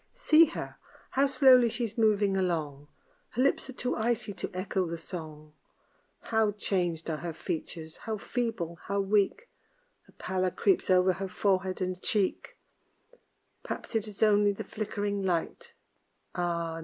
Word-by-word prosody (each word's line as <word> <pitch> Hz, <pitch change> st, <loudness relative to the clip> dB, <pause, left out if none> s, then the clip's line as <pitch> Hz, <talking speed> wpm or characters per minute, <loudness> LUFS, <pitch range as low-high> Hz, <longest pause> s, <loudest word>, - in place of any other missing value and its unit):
See 330 Hz, -9 st, +6 dB
her! 325 Hz, -, -6 dB, 0.3 s
How 275 Hz, +1 st, +3 dB
slowly 260 Hz, -3 st, +6 dB
she's 230 Hz, -1 st, -3 dB
moving 210 Hz, -3 st, +3 dB
along 155 Hz, -6 st, -2 dB, 0.4 s
Her 250 Hz, -, 0 dB
lips 275 Hz, -, +1 dB
are -, -, -6 dB
too 250 Hz, 0 st, -2 dB
icy 220 Hz, -2 st, -1 dB
to 190 Hz, -, -5 dB
echo 185 Hz, 0 st, -1 dB
the 165 Hz, 0 st, -4 dB
song. 155 Hz, -3 st, -9 dB, 0.7 s
How 220 Hz, -2 st, +1 dB
changed 175 Hz, -5 st, -1 dB
are 160 Hz, -2 st, -2 dB
her 170 Hz, +1 st, -5 dB
features! 160 Hz, -1 st, -5 dB
How 220 Hz, -1 st, -4 dB
feeble! 200 Hz, -8 st, -3 dB
how 200 Hz, 0 st, -1 dB
weak! 205 Hz, -, +1 dB, 0.6 s
A -, -, -19 dB
pallor 185 Hz, 0 st, -1 dB
creeps 375 Hz, -, +1 dB
over 185 Hz, 0 st, +5 dB
her 190 Hz, +2 st, -4 dB
forehead 190 Hz, 0 st, 0 dB
and 185 Hz, 0 st, -2 dB
cheek 215 Hz, -, -1 dB, 1.0 s
Perhaps -, -, -6 dB
it 220 Hz, -2 st, 0 dB
is 210 Hz, 0 st, -3 dB
only 205 Hz, -1 st, +5 dB
the 200 Hz, -, -5 dB
flickering 205 Hz, -1 st, -3 dB
light, 180 Hz, -3 st, -2 dB, 0.6 s
Ah! 170 Hz, -2 st, -2 dB
195 Hz, 145 wpm, -29 LUFS, 175-220 Hz, 1.0 s, See